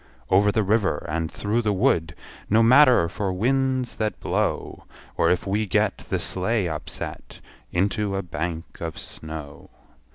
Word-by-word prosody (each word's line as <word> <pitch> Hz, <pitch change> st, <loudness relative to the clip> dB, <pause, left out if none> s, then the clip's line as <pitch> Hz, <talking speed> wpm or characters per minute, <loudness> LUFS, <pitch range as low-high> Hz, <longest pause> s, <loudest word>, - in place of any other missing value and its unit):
Over 100 Hz, +2 st, +5 dB
the 110 Hz, -, +1 dB
river, 105 Hz, +1 st, +1 dB
and 80 Hz, +1 st, -2 dB
through 105 Hz, +3 st, -1 dB
the 105 Hz, -2 st, +1 dB
wood 85 Hz, -7 st, +1 dB, 0.3 s
No 110 Hz, +3 st, +5 dB
matter 125 Hz, -, +6 dB
for 95 Hz, +3 st, -3 dB
winds 130 Hz, +5 st, 0 dB
that 110 Hz, -1 st, -2 dB
blow; -, -, -2 dB, 0.3 s
Or -, -, +3 dB
if 90 Hz, -, +1 dB
we 105 Hz, +2 st, 0 dB
get -, -, +1 dB
The -, -, -3 dB
sleigh 95 Hz, +1 st, 0 dB
upset, 80 Hz, -2 st, -6 dB, 0.3 s
Into 100 Hz, +2 st, 0 dB
a 95 Hz, -, -2 dB
bank 85 Hz, 0 st, -4 dB, 0.2 s
of 80 Hz, -1 st, -4 dB
snow. 80 Hz, -2 st, -7 dB
100 Hz, 150 wpm, -24 LUFS, 85-110 Hz, 0.3 s, matter